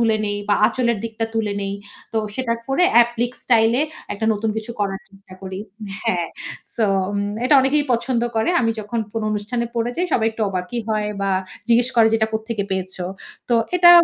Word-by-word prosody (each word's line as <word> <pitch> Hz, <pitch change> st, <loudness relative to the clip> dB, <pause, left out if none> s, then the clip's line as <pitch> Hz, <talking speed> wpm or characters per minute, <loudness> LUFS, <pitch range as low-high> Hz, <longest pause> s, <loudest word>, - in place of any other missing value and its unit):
তুলে 225 Hz, -2 st, +3 dB
নেই 205 Hz, 0 st, -2 dB
বা 205 Hz, -, +5 dB
আঁচলের 235 Hz, -3 st, +1 dB
দিকটা 225 Hz, 0 st, -2 dB
তুলে 220 Hz, -2 st, 0 dB
নেই। 195 Hz, 0 st, -2 dB, 0.4 s
তো -, -, -2 dB, 0.2 s
সেটা 255 Hz, -1 st, -1 dB, 0.2 s
করে 270 Hz, +7 st, +3 dB
অ্যাপ্লিক 235 Hz, 0 st, +4 dB
স্টাইল 225 Hz, -2 st, +4 dB
এ -, -, +4 dB, 0.3 s
একটা 220 Hz, +2 st, -2 dB
নতুন 215 Hz, +1 st, -1 dB
কিছু 220 Hz, +1 st, -4 dB
করার 195 Hz, -1 st, -1 dB
চেষ্টা 195 Hz, -1 st, -16 dB
করি। 190 Hz, 0 st, -5 dB, 0.5 s
হ্যাঁ। 180 Hz, -7 st, +1 dB, 0.5 s
সো 230 Hz, -, +2 dB, 0.6 s
এটা 260 Hz, -, +5 dB
অনেকেই 285 Hz, +3 st, +2 dB
পছন্দ 235 Hz, 0 st, 0 dB
করে। 220 Hz, +9 st, +2 dB
আমি 230 Hz, -2 st, +2 dB
যখন 215 Hz, +3 st, -4 dB
কোনো 225 Hz, -1 st, -2 dB
অনুষ্ঠানে 215 Hz, +3 st, -2 dB
পড়ে 235 Hz, 0 st, 0 dB
যাই 360 Hz, +1 st, +1 dB
সবাই 225 Hz, -, +3 dB
একটু 225 Hz, 0 st, -4 dB
অবাকই 185 Hz, +5 st, -3 dB
হয় 215 Hz, -1 st, 0 dB
বা 195 Hz, 0 st, 0 dB, 0.4 s
জিজ্ঞেস 240 Hz, +1 st, +4 dB
করে 225 Hz, -1 st, +7 dB
যে 225 Hz, -, +3 dB
এটা 220 Hz, 0 st, +1 dB
কোত্থেকে 220 Hz, -1 st, -2 dB
পেয়েছ। 190 Hz, 0 st, -2 dB, 0.5 s
তো 240 Hz, -, +3 dB, 0.2 s
এটা 345 Hz, -1 st, +8 dB
225 Hz, 190 wpm, -21 LUFS, 205-235 Hz, 0.6 s, এটা